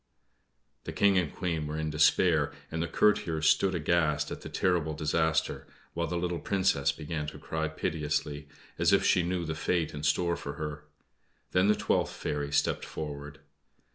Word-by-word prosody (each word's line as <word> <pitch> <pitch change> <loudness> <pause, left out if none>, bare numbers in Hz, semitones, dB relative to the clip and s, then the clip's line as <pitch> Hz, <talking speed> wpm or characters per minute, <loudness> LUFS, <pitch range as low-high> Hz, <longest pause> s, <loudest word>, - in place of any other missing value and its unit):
The - - -5
King 100 -2 +4
and 85 -5 -2
Queen 80 -4 -2
were 75 +1 -4
in 80 -1 -2
despair, 75 0 +3 0.2
and 80 +1 -2
the 85 - -1
courtiers 80 -4 +2
stood 95 +4 +3
aghast 75 -3 +1
at - - -6
the - - -8
terrible 85 -4 0
disaster; 80 +1 0 0.3
while 85 0 -1
the 85 - -2
little 85 -1 -2
Princess 95 -8 +1
began 75 0 -5
to - - -7
cry 80 0 -3
piteously, 75 -2 -2 0.3
as - - +4
if - - +4
she 90 - +4
knew 85 0 -2
the 80 - -2
fate 80 0 -1
in 75 - -6
store 85 +4 +1
for 70 - -6
her. 75 -1 -6 0.7
Then 90 +2 +3
the 105 - +5
twelfth - - 0
fairy 75 -1 -3
stepped 75 0 +1
forward. 75 -1 -7
80 Hz, 170 wpm, -29 LUFS, 75-85 Hz, 0.7 s, the